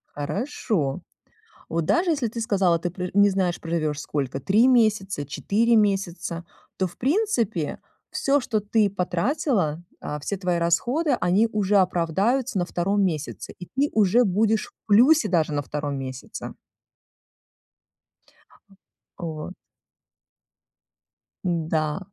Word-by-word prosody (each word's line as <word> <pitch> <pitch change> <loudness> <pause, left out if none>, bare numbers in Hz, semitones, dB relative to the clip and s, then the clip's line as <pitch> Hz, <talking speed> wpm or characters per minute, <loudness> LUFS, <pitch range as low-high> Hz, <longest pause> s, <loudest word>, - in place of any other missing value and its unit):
Хорошо. 155 - -2 0.7
Вот 165 -1 -1
даже 335 - +2
если 275 -7 0
ты 230 +1 -5
сказала, 190 -6 +2
ты 175 - -2
пр 180 0 -4
не 205 0 +5
знаешь, 185 -2 0
проживешь 155 -3 -2
сколько, 135 -3 -3
3 210 - +4
месяца, 210 - +2
4 220 - +1
месяца, 180 -5 0 0.3
то, 190 - +1
в 175 - -16
принципе, 245 - 0 0.3
всё, 280 +1 +2
что 225 -4 -1
ты 210 0 +2
потратила, 185 - 0 0.2
а, 150 - -5
все 195 +7 -3
твои 180 -2 0
расходы, 245 - +1
они 190 +6 +3
уже 205 -1 +2
оправдаются 195 +7 +1
на 175 - 0
2 195 +4 0
месяце, 155 -6 -3
и 180 - -8
ты 275 +9 -1
уже 220 +3 +4
будешь 215 +2 +1
в - - -21
плюсе 255 +10 +5
даже 165 -4 +1
на 145 - 0
2 145 0 -4
месяце. 130 -1 -7 2.7
Вот. 160 -1 -5 1.9
Н-да. 160 -2 0
190 Hz, 120 wpm, -24 LUFS, 165-225 Hz, 2.7 s, не